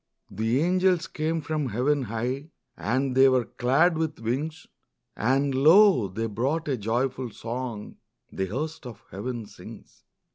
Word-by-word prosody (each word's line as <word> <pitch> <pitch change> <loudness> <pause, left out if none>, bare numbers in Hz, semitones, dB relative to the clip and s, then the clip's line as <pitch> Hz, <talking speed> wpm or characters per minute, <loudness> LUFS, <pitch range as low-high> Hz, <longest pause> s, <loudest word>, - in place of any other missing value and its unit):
The 115 +5 0
angels 185 0 +2
came 160 +1 -2
from 150 -3 -2
heaven 135 +6 +1
high, 125 +6 -3 0.3
And 130 +4 -1
they 135 0 +7
were 130 -2 +2
clad 145 +9 +2
with 160 -2 -2
wings; 145 +7 -3 0.5
And 135 +4 +1
lo, 160 - +6
they 110 +5 -4
brought 130 +10 -1
a 140 - +1
joyful 125 +3 -2
song 115 -1 -6 0.3
The 95 - -2
host 150 - -4
of 115 - -11
heaven 115 +3 -5
sings. - - -13
130 Hz, 140 wpm, -26 LUFS, 115-155 Hz, 0.5 s, they